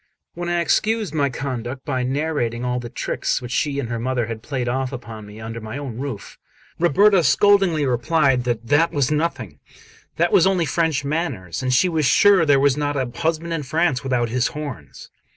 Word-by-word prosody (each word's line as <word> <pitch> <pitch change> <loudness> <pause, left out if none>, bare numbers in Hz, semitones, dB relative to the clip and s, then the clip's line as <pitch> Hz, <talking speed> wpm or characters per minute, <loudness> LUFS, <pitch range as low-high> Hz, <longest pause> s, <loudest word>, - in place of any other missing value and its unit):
When 175 0 -4
I 175 0 +1
excused 210 +3 0
my 145 -3 +1
conduct 130 0 -5
by 130 -3 -1
narrating 125 -3 -2
all 125 0 -1
the 120 -1 -7
tricks 125 - -2
which 125 -2 -8
she 145 +1 0
and 130 - -3
her 115 -1 -3
mother 125 0 -1
had 110 -1 -6
played 130 -1 -3
off 130 +1 -1
upon 115 -5 -8
me 105 +1 -11
under 115 +1 -7
my 110 +4 -6
own 130 -5 -6
roof, 135 -7 -6 0.4
Ruberta 185 +3 +4
scoldingly 175 +1 +3
replied 130 +1 +2
that 120 -2 -2
'that' 145 +7 +3
was 140 -1 0
nothing 160 +3 -2 0.6
that - - +1
was 405 - +5
only 185 -3 +1
French 160 -4 0
manners, 140 - -3
and 130 -1 -1
she 130 +9 +4
was 160 -5 +1
sure 190 +3 +5
there 140 -1 +5
was 140 -1 +3
not 145 -1 -2
a 130 -3 -2
husband 165 0 -1
in 165 - -2
France 155 0 0
without 125 -3 0
his 125 +2 +1
horns. 135 - -8
140 Hz, 195 wpm, -21 LUFS, 125-160 Hz, 0.6 s, was